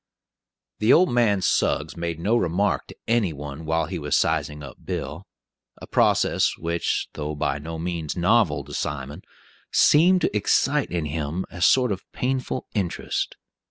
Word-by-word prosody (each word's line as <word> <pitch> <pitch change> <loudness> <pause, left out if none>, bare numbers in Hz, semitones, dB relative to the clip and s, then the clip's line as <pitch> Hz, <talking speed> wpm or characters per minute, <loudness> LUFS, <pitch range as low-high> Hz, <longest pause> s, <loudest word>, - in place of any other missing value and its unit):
The 110 +2 +4
old 180 +1 +5
man 105 -6 +2
Suggs - - +1
made 85 -1 -4
no 105 +7 +1
remark 100 -1 0
to - - -12
any 115 -7 +2
one 75 +2 -8
while 80 0 +1
he 90 0 -5
was 75 -1 +1
sizing 75 -2 0
up 70 - -10
Bill, 75 +7 -5 0.5
a - - -9
process - - +2
which, 85 +1 -1
though 75 0 -4
by 75 0 -1
no 80 +3 -6
means 85 -2 -4
novel 85 -6 +2
to 70 +1 -11
Simon, 70 +4 -4 0.5
seemed 180 +5 +5
to - - 0
excite 135 +7 +2
in 85 -3 -2
him 75 +4 -3
a 90 - -8
sort 125 +4 +4
of 95 -1 -3
painful 130 0 -2
interest. 95 -6 -2
85 Hz, 160 wpm, -24 LUFS, 75-105 Hz, 0.5 s, old